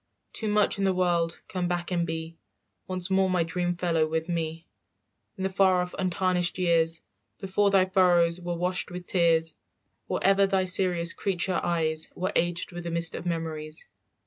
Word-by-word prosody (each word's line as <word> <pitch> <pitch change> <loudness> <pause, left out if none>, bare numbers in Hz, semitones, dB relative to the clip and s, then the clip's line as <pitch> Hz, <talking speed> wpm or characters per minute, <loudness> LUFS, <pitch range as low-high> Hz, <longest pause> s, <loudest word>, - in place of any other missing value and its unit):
"Too 220 - -3
much 210 -1 +2
in - - 0
the 190 -1 +2
world, 175 -2 0
come 180 -2 -2
back 175 0 -3
and 170 -1 0
be 165 0 -5 0.5
Once 185 0 -3
more 190 0 +3
my 180 -2 +2
dream 175 +1 -2
fellow 165 -3 +1
with 160 +2 -2
me, 165 -1 -3 0.7
"In 190 - -4
the 190 - +1
far 185 -1 +3
off 180 - -8
untarnished 180 -1 0
years 165 -2 +3 0.3
Before 200 +1 +1
thy 195 -2 +4
furrows 180 -2 +3
were 175 0 -3
washed 180 +1 -1
with 180 0 -7
tears, 165 -3 +2 0.5
"Or - - -1
ever 195 0 +4
thy 190 -1 +1
serious 180 -2 +2
creature 185 -1 0
eyes 160 -2 +1
Were 185 +2 -2
aged 175 +1 0
with 175 0 -7
a - - -2
mist 170 -1 0
of 175 - -6
memories. 160 -2 -4
175 Hz, 175 wpm, -27 LUFS, 165-185 Hz, 0.7 s, thy